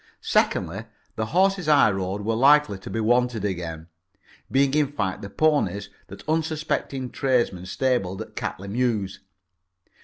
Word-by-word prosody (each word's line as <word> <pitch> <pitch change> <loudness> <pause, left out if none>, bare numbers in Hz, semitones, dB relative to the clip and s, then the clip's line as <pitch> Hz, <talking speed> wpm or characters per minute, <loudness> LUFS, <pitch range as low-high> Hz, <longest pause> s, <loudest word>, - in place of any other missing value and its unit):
Secondly, - - 0 0.3
the 110 - -2
horses 190 - +2
I 145 -7 +6
rode 95 +1 -3
were 115 - +1
likely 135 -3 +4
to - - -9
be 115 - -3
wanted 120 -1 +1
again, 85 -4 -4 0.6
being 135 0 +2
in 150 -2 +2
fact 105 -8 -2
the 100 - -7
ponies 100 - +1 0.2
that 100 - -12
unsuspecting 155 -4 -2
tradesmen 120 -9 0
stabled 110 -4 -1
at - - -19
Catley 100 - -4
Mews. 110 -3 -1
115 Hz, 135 wpm, -24 LUFS, 100-145 Hz, 0.6 s, I